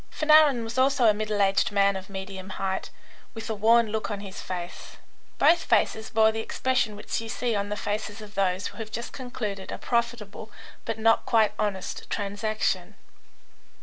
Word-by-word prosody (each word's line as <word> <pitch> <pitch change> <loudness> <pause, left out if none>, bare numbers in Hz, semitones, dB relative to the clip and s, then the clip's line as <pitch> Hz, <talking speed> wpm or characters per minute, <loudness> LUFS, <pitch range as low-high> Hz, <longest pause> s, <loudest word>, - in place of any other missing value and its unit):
Fanarin 305 -5 +5
was 225 +3 -3
also 270 -1 +3
a 215 - +6
middle 210 -1 0
aged 195 +1 +2
man 200 -1 +3
of 190 0 -7
medium 190 -1 -7
height, 190 -1 -2 0.5
with 225 0 -6
a - - 0
worn 225 +1 +4
look 220 0 -2
on 205 -2 -3
his 195 -1 -8
face. 180 -1 -7 0.4
Both 340 0 +4
faces 220 -1 +1
bore 220 0 +4
the 220 - -4
expression 245 -1 0
which 210 +2 -3
you 225 - -7
see 240 0 -1
on 200 0 -1
the 210 - -3
faces 210 +1 -3
of 210 -1 -11
those 190 -1 0
who - - -6
have 220 -1 -5
just 235 +2 -5
concluded 215 -7 -5
a - - -4
profitable 235 -3 -2 0.4
but 225 -1 -3
not 225 +1 +3
quite 220 -2 +3
honest 200 -3 -3
transaction. 210 +1 -2
215 Hz, 180 wpm, -26 LUFS, 200-230 Hz, 0.5 s, a